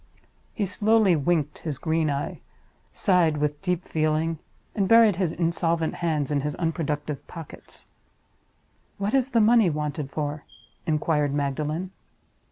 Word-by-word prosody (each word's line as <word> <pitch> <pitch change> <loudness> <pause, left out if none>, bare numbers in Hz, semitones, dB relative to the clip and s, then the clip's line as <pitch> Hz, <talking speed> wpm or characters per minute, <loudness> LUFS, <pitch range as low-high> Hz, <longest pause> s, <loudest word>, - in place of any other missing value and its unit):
He 210 - -1
slowly 205 0 +3
winked 155 -1 0
his 150 -5 -4
green 160 +1 0
eye; 140 0 -3 0.5
sighed 175 -6 +2
with 150 0 -1
deep 180 -2 -1
feeling; 155 +1 0 0.3
and 195 -3 0
buried 230 -4 +6
his 180 -4 0
insolvent 165 -1 0
hands 155 -4 -1
in 145 -1 +1
his 150 +1 -3
unproductive 150 -3 -3
pockets. 165 -3 -9 1.1
"What 200 +2 -2
is 270 -1 +2
the 235 - +2
money 220 -3 +5
wanted 150 -2 -3
for?" 145 0 -3 0.4
inquired 150 -2 +1
Magdalen. 150 +5 -2
160 Hz, 130 wpm, -25 LUFS, 150-180 Hz, 1.1 s, buried